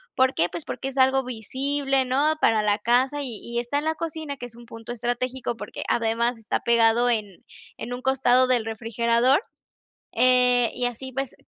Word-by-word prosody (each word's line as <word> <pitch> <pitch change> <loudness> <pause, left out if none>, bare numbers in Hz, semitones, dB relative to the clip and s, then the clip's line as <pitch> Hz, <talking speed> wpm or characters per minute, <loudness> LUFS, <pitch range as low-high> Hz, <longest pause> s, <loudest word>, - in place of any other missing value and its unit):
¿por 260 0 +3
qué?, 170 - +1
pues 335 - -6
porque 270 - -5
es 270 - -11
algo 265 0 +3
visible, 270 +3 -1
¿no?, 280 +5 +2
para 220 -1 +3
la 205 -1 +2
casa 255 +6 +1
y 245 -6 -4
y 235 0 -3
está 240 +4 -2
en 295 - -6
la 315 0 0
cocina, 315 -2 -5
que 245 - -7
es 240 -1 -12
un 240 0 -13
punto 230 0 -9
estratégico, 245 +1 -3
porque 210 -2 -7
además 235 +1 0
está 225 -1 -3
pegado 235 +1 +3
en 210 -6 -2 0.3
en 245 - -6
un 245 - -6
costado 255 -1 +3
del 245 -3 +2
refrigerador, 235 - +1 0.7
eh, 250 -1 +4
y 250 - -2
así, 245 +2 -4
pues, 270 0 -4
245 Hz, 190 wpm, -24 LUFS, 230-265 Hz, 0.7 s, eh